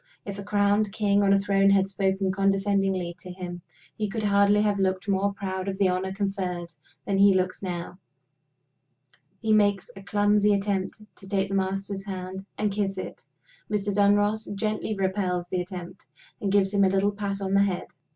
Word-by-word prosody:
If 200 0 -6
a - - -5
crowned 205 0 +2
king 205 -1 +2
on 200 -1 +3
a 200 - +6
throne 195 0 +3
had 195 -1 +4
spoken 195 0 0
condescendingly 195 -2 +1
to 180 - -11
him, 180 -1 -7 0.3
he 210 -1 -2
could 220 +1 -3
hardly 200 0 +4
have 205 -1 +1
looked 190 0 0
more 200 0 +1
proud 190 -1 -4
of 195 -1 -3
the 195 -2 +3
honor 185 +1 -1
conferred 190 -3 -3 0.3
than 195 -1 0
he 200 -1 +6
looks 185 0 -1
now. 180 -1 -5 1.4
He 220 -1 +3
makes 205 -3 +2
a 195 - -10
clumsy 205 +1 +3
attempt 200 +1 -2
to 190 - -13
take 195 -1 0
the - - -4
Master's 195 0 -2
hand 190 0 -6
and 210 -1 0
kiss 195 -1 -1
it. - - -7 0.5
Mr. 205 -1 0
Dunross 205 +2 +2
gently 215 +1 -2
repels 190 -2 -1
the 185 - -1
attempt, 180 0 -8 0.3
and 200 -2 -1
gives 195 0 +3
him 200 -1 +4
a 190 - +5
little 195 +2 +2
pat 200 -1 -4
on 195 -1 -2
the 200 - +5
head. 195 -3 0
195 Hz, 180 wpm, -26 LUFS, 190-205 Hz, 1.4 s, a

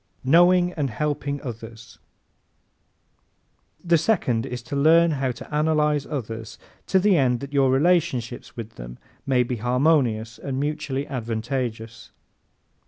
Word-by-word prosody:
Knowing 175 +5 +4
and 145 -4 -2
Helping 145 +2 -2
Others 115 -2 -9 1.8
¶ - - -15
The 170 -1 +4
second 135 - 0
is 125 -2 -6
to 140 - -6
learn 165 +4 +5
how 135 -3 -1
to 120 - -11
analyze 150 -1 +1
others 115 -6 -6 0.3
to 190 - +3
the 195 +1 +4
end 125 -4 +2
that 140 +1 -8
your 135 -2 +3
relationships 135 -6 0
with 115 -1 -8
them - - -9 0.3
may 130 -2 +3
be 125 0 -4
harmonious 120 -2 +1
and 135 -1 -4
mutually 145 -1 -2
advantageous. 115 -2 -4
135 Hz, 130 wpm, -23 LUFS, 120-150 Hz, 1.8 s, learn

